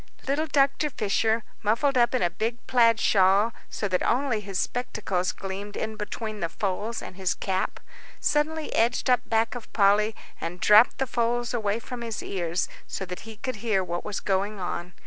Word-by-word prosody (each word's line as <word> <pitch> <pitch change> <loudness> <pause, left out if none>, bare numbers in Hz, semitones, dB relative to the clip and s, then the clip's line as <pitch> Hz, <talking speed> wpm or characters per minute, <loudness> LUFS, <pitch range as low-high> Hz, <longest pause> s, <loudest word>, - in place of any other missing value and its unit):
Little 295 +4 +1
Dr. 275 +1 +2
Fisher, 220 -1 +1 0.2
muffled 235 +7 +2
up 240 +1 +3
in 250 - +1
a 175 - +2
big 230 +6 -3
plaid 230 -3 +4
shawl 200 +3 +4 0.2
so 205 - -2
that 185 -2 0
only 250 -2 +1
his 195 -2 -5
spectacles 200 -7 -1
gleamed 195 +2 -6
in 220 0 -3
between 215 0 -5
the 170 -3 -1
folds 205 +5 -3
and - - -8
his 190 -2 0
cap, 190 -1 -2 0.4
suddenly 310 +1 0
edged 240 +3 +2
up 250 - +5
back 225 0 +2
of 245 -3 -8
Polly, 210 +1 +4 0.3
and 175 +2 -4
dropped 210 +5 +6
the 270 - 0
folds 240 0 0
away 215 -3 0
from 240 +1 -7
his 230 -2 -4
ears 175 -2 -1 0.2
so 190 - -4
that 180 -1 -6
he 220 - -8
could 255 +1 -4
hear 205 -3 +1
what 175 -1 -4
was 210 -2 -3
going 200 +1 -1
on. 175 -1 -4
215 Hz, 185 wpm, -26 LUFS, 195-240 Hz, 0.4 s, dropped